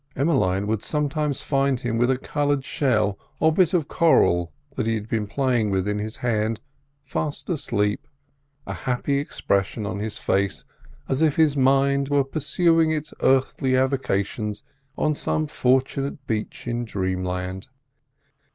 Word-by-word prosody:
Emmeline 105 - +1
would 105 0 -1
sometimes 150 0 -1
find 135 -2 +1
him 120 -2 -1
with 120 +1 +3
a 130 - +2
coloured 145 0 -1
shell 110 -8 +1 0.2
or 160 +1 +4
bit 180 0 +3
of 170 -6 +1
coral 85 - +3 0.2
that 110 - -1
he 115 - +1
had 105 -1 -5
been 110 -2 -1
playing 120 -2 +1
with 95 0 0
in 105 0 -1
his 110 +2 -5
hand 110 -2 0 0.4
fast 145 0 -3
asleep, 105 -10 -1 0.6
a - - -4
happy 130 +2 -1
expression 100 -6 -1
on 100 -1 -3
his 105 0 -4
face, 100 0 0 0.4
as 135 +3 0
if 155 -3 +3
his 155 -3 +3
mind 140 +1 +3
were 145 -1 +3
pursuing 160 +4 +2
its 155 -1 -2
earthly 130 0 +2
avocations 105 -5 -1 0.3
on 150 - +2
some 155 +1 -1
fortunate 135 0 0
beach 110 -3 -3
in 120 0 -1
dreamland. 95 -2 -3
130 Hz, 145 wpm, -24 LUFS, 105-145 Hz, 0.6 s, or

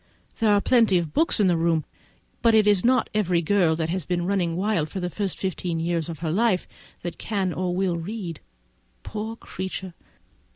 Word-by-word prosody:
There 220 -2 +3
are 205 -1 +4
plenty 230 -7 +4
of 165 -3 -2
books, 330 - +3 1.0
but 230 -1 +5
it 215 -1 +5
is 205 -3 +4
not 255 -1 +3
every 180 -5 +1
girl 175 -2 +3
who 165 - -2
has 175 +2 -2
been 175 +3 -1
running 180 -3 0
wild 185 -4 0
the 180 +2 -4
first 200 -1 -3
fifteen 180 -3 -2
years 170 -1 -1
of 165 - -5
her 155 - 0
life, 200 0 +1 0.4
that 175 -1 -5
can 195 -5 -1
or 180 0 -2
will 185 -2 0
read. 175 -1 -5 0.6
Poor 220 +1 -5
creature! 190 -4 -6
185 Hz, 170 wpm, -25 LUFS, 170-210 Hz, 1.0 s, but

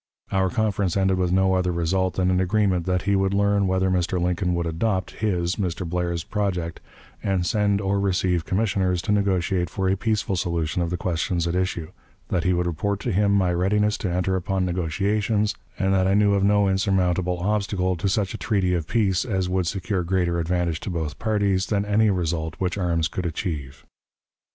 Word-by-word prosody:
Our 95 -1 +2
conference 100 -5 0
ended 95 -1 +2
with 90 -1 +1
no 95 0 +3
other 90 -1 +1
result 90 +2 0
than 95 -1 +1
an 90 - +2
agreement 95 -2 +1
that 90 0 0
he 100 0 +2
would 95 0 +1
learn 100 -1 +2
whether 95 0 +1
Mr. 90 0 0
Lincoln 90 +1 0
would 85 0 -1
adopt 95 +3 -1
his 90 -5 -1
(Mr. 90 -3 -2
Blair's) 85 -1 -2
project, 90 -5 -2 0.4
and 95 -3 0
send 100 +1 +1
or 100 0 0
receive 90 -3 +1
commissioners 95 -3 0
to 105 - -1
negotiate 95 -3 +1
for 95 +3 -2
a 95 - +2
peaceful 105 -1 -1
solution 85 -1 -1
of 85 - -1
the 90 - -2
questions 85 0 -1
at 85 - -1
issue; 90 -3 -2 0.4
that 85 - 0
he 90 - +2
would 90 0 +1
report 95 +4 -1
to 120 - -2
him 100 +1 +2
my 95 -3 +2
readiness 105 +4 +1
to 95 - -2
enter 90 +2 0
upon 95 +1 -1
negotiations, 100 +5 0 0.2
and 95 -1 +1
that 95 -1 +2
I 95 - +3
knew 105 -1 +4
of 100 -1 +2
no 100 0 +4
insurmountable 95 -2 +1
obstacle 95 -1 0
to 95 +3 -1
such 100 -2 0
a - - -6
treaty 95 -4 +1
of 85 -3 -2
peace 100 -5 +1
as 95 -6 -1
would 90 -1 0
secure 95 +1 -1
greater 85 -1 0
advantage 85 -1 -1
to - - -6
both 80 -4 -4
parties 100 -4 +1
than 100 -1 0
any 105 +1 +3
result 80 -3 -1
which 90 -2 -1
arms 85 -4 0
could 90 0 -3
achieve. 75 -5 -5
95 Hz, 195 wpm, -24 LUFS, 90-100 Hz, 0.4 s, knew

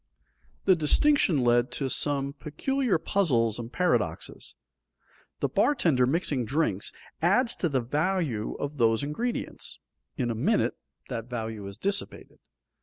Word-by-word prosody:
The 190 - +6
distinction 170 - +3
led 120 0 +3
to 135 - -1
some 140 +1 +1
peculiar 220 - -1
puzzles 125 - +1
and 120 0 -6
paradoxes. 180 +7 -1 0.9
The - - +2
bartender 165 - +2
mixing 145 -3 0
drinks, 120 - 0 0.3
adds 230 +9 +3
to 175 - 0
the 135 -3 +1
value 145 - -1
of 145 +1 -5
those 115 -1 +3
ingredients; 230 +13 -3 0.4
in 120 -3 0
a - - 0
minute 110 - +2 0.4
that 115 +1 -5
value 110 -4 -4
is 100 0 -9
dissipated. 200 - -4
140 Hz, 125 wpm, -27 LUFS, 120-180 Hz, 0.9 s, The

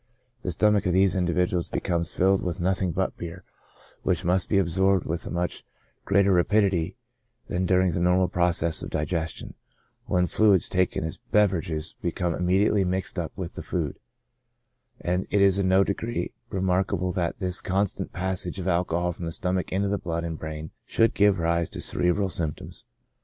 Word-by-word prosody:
The 95 - -3
stomach 105 +3 +2
of 90 - +1
these 95 +1 +3
individuals 90 -1 0
becomes 85 -2 -1
filled 95 +1 +2
with 90 +1 -3
nothing 95 0 0
but - - -1
beer, 85 +1 -7 0.6
which - - 0
must 90 +1 +1
be 100 - +3
absorbed 95 +1 +2
with 80 +1 -3
a - - -4
much 90 0 -3 0.4
greater 100 0 +3
rapidity 95 -1 +2 0.5
than 90 +1 -1
during 95 0 +3
the 85 - -2
normal 90 +1 +3
process 85 -2 +1
of - - -5
digestion, 80 +1 -3 0.5
when 90 0 +2
fluids 100 -2 +3
taken 90 -3 0
as 80 -2 -4
beverages 85 -6 +1
become 85 0 -1
intimately 95 +4 +2
mixed 95 0 -2
up 80 -3 -3
with 90 -4 -6
the - - -7
food; - - -3 1.0
and 90 +2 -1
it 100 - +2
is 100 0 +4
in 95 - +1
no 95 +1 +5
degree 115 +4 -3 0.2
remarkable 95 -1 0
that 85 -2 -2
this 95 -2 -2
constant 95 +1 -1
passage 95 -1 +2
of 95 -1 -4
alcohol 85 0 +1
from 85 - -7
the - - -3
stomach 90 +2 -2
into 100 +2 0
the 100 0 -1
blood 85 -3 -3
and 80 -2 -4
brain 80 0 -6 0.2
should 115 0 +2
give 100 -1 +4
rise 85 0 0
to - - -6
cerebral 90 +3 +1
symptoms. 80 -4 -4
90 Hz, 170 wpm, -26 LUFS, 85-95 Hz, 1.0 s, no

